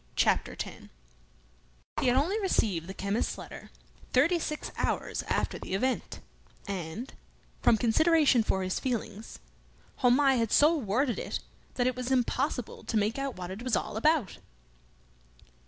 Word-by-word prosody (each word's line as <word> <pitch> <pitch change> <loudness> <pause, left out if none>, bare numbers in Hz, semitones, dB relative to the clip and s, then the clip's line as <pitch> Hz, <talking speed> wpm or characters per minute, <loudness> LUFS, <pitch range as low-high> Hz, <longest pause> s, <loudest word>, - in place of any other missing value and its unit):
Chapter - - +2
Ten - - -7 1.1
He - - +1
had 250 +1 +4
only 355 +11 +1
received 195 - +1
the 190 - -6
chemist's 200 +4 -1
letter - - -10 0.4
thirty 325 +7 +4
six 305 -1 -4
hours - - -1
after - - -1
the 185 - -4
event; 255 +6 -2 0.5
and, 195 +5 -5 0.5
from 225 - +5
consideration 295 +3 +4
for 190 -3 0
his 185 0 -1
feelings, 225 -4 -4 0.6
Homais 260 +1 +4
had 230 -2 0
so 305 +3 +5
worded 245 0 0
it - - -3 0.4
that 245 - +1
it 255 -1 +1
was 250 0 -4
impossible 255 -1 -1
to 225 - 0
make 215 +5 0
out 275 -1 -3
what 180 0 -6
it 195 +4 -7
was 250 -3 0
all - - -2
about. 280 - +1
245 Hz, 145 wpm, -29 LUFS, 210-275 Hz, 1.1 s, from